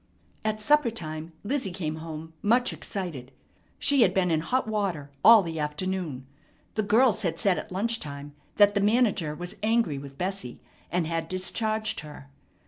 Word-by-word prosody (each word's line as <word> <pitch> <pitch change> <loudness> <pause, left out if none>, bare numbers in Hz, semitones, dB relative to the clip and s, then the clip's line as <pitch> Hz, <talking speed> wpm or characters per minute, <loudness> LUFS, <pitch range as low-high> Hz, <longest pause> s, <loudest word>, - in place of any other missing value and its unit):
At 215 0 -1
supper 295 +3 +4
time 160 -6 -6
Lizzie 255 -1 -1
came 160 -4 -3
home 160 0 -7
much 240 +4 +2
excited. 165 -11 -5 0.5
She 280 -2 +3
had 190 -5 +4
been 180 -2 +2
in 160 - +3
hot 250 +10 0
water 190 -10 -2
all 225 -3 +9
the 165 -2 -4
afternoon. 150 -2 -3 0.5
The 215 - 0
girls 220 +2 +4
had 165 -5 -1
said 195 -1 +2
at - - -9
lunch 225 +5 0
time 145 0 -7 0.2
that 205 0 +6
the 200 - +1
manager 205 -8 +2
was 175 +5 -6
angry 220 -9 +1
with 135 0 -10
Bessie, 185 -8 -4 0.3
and 175 -1 +1
had 165 0 -2
discharged 215 +4 -2
her. 110 - -11
185 Hz, 165 wpm, -27 LUFS, 155-215 Hz, 0.5 s, all